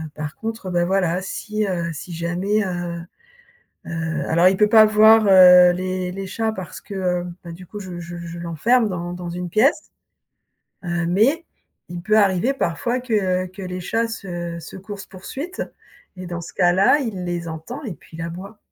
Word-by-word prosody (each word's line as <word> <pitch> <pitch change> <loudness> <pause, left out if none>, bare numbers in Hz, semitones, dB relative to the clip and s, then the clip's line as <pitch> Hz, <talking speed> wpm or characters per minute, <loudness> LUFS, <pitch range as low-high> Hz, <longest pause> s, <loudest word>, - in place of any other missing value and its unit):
par 150 -1 -5
contre, 225 -4 -5
ben, 175 -1 +1
voilà, 185 -1 +1
si, 215 +2 -3
heu, 170 -3 -2
si 170 +3 -8
jamais, 175 +6 -1
heu, 175 -2 -4 0.9
heu 165 -1 -3
alors 170 +3 +4
il 190 - 0
peut 210 +1 +4
pas 220 -1 +8
voir 215 +1 +6
heu, 180 -2 +8
les 185 0 -3
les 195 +1 -6
chats 225 +3 -1
parce 185 -6 -8
que - - -10
heu, 180 -2 -1 0.2
ben 170 - -8
du 180 +2 -11
coup 210 +4 -9
je 185 -3 -7
je 175 0 -8
je 170 0 -7
l'enferme 210 - +1
dans 175 -1 -4
dans 180 -1 -6
une 175 +1 -5
pièce 245 - +3 1.0
heu, 175 -1 -2
mais 235 - +2 0.4
il 175 0 -7
peut 215 +3 +3
arriver 200 +5 +3
parfois 240 +4 -1
que 190 -7 0
que 185 +2 -11
les 180 0 -5
chats 225 +6 -1
se, 175 -6 -6
heu, - - -9
coursent 200 +1 -8
poursuite 275 - -6 0.5
et 185 0 -7
dans 175 -1 -5
ce 170 - -9
cas-là, 190 +9 +4
il 210 -9 -4
les 175 -1 -3
entend 160 - -7
et 210 -8 -5
puis 160 - -15
il 165 - -5
aboie. 185 +6 -7
185 Hz, 185 wpm, -21 LUFS, 175-215 Hz, 1.0 s, pas